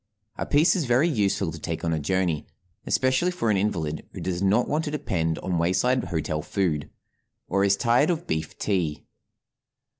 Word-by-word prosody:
A - - -4
piece 150 +6 +4
is 170 -6 0
very 125 +6 +3
useful 100 - 0
to 80 - -8
take 80 +2 -4
on 80 - +1
a 80 - 0
journey, 85 0 0 0.4
especially 130 +7 +2
for 145 -12 0
an 100 - +2
invalid 80 -7 -1
who - - -7
does 90 -1 -3
not 105 +5 +3
want 155 +2 0
to - - -2
depend 80 - -1
on 90 -3 -2
wayside 120 +10 +2
hotel 75 -2 -2
food, 80 -6 -1 0.6
or 100 - +1
is 100 0 +3
tired 120 +7 +3
of 170 -1 -1
beef 80 0 -3
tea. 85 -8 -1
95 Hz, 180 wpm, -25 LUFS, 80-130 Hz, 0.6 s, piece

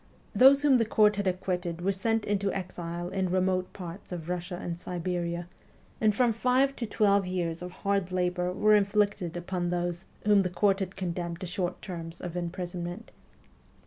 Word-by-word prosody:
Those 275 +2 +7
whom 280 -3 +6
the 230 - +2
court 210 -1 +4
had 200 -1 0
acquitted 180 -2 -2
were 195 +3 +2
sent 225 +3 0
into 200 -1 0
exile 175 -2 -4
in 190 -1 -1
remote 185 0 +1
parts 180 +1 -9
of 170 -2 -5
Russia 180 0 -3
and 170 - -4
Siberia, 175 0 -3 0.5
and 215 -2 +3
from 240 -1 +3
five 255 +4 +2
to 230 - -3
twelve 200 -3 +3
years 175 -2 -2
of 180 - -5
hard 195 -1 -1
labour 180 0 0
were 215 +3 +3
inflicted 205 -4 +2
upon 175 0 -2
those 175 0 -2 0.2
whom 205 -1 +6
the 185 - -1
court 195 +2 +2
had 190 -1 -4
condemned 175 -2 -3
to - - -3
short 180 0 -3
terms 165 -2 -6
of 175 -1 -6
imprisonment. 175 +2 -5
185 Hz, 175 wpm, -29 LUFS, 175-205 Hz, 0.5 s, Those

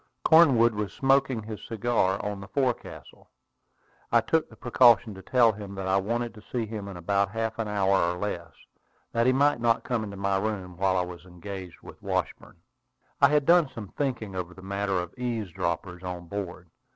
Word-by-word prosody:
Cornwood 135 -9 +6
was 105 -3 -3
smoking 135 -4 +2
his 110 -1 -8
cigar 115 -4 0
on 105 -1 -4
the 100 - -9
forecastle. 130 -2 -3 0.8
I - - +6
took 160 0 0
the 110 - -15
precaution 120 -1 +4
to 95 - -10
tell 120 +1 +4
him 100 -1 -8
that 95 -1 -4
I 95 +1 +3
wanted 115 +4 -1
to 105 - -13
see 120 -3 -1
him 105 -2 -6
in 95 -3 -7
about 100 +3 +1
half 115 +1 -3
an 110 - -1
hour 95 -4 +2
or 90 - -5
less, 85 -5 -4 0.6
that 115 +1 +2
he - - +6
might 140 -1 +2
not 115 -1 +2
come 120 -3 -1
into 100 -2 -7
my 100 0 0
room 95 -4 -3
while 95 +1 +1
I 90 - +2
was 90 -1 -10
engaged 90 0 -9
with - - -13
Washburn. - - -3 0.6
I 140 - +8
had 150 -1 +2
done 170 -3 +5
some 115 -6 -8
thinking 115 -8 -3
over 90 -1 -5
the 95 - -13
matter 100 0 -1
of 90 0 -5
eavesdroppers 90 -6 -3
on 90 -1 -6
board. 90 -2 -6
105 Hz, 190 wpm, -27 LUFS, 95-120 Hz, 0.8 s, I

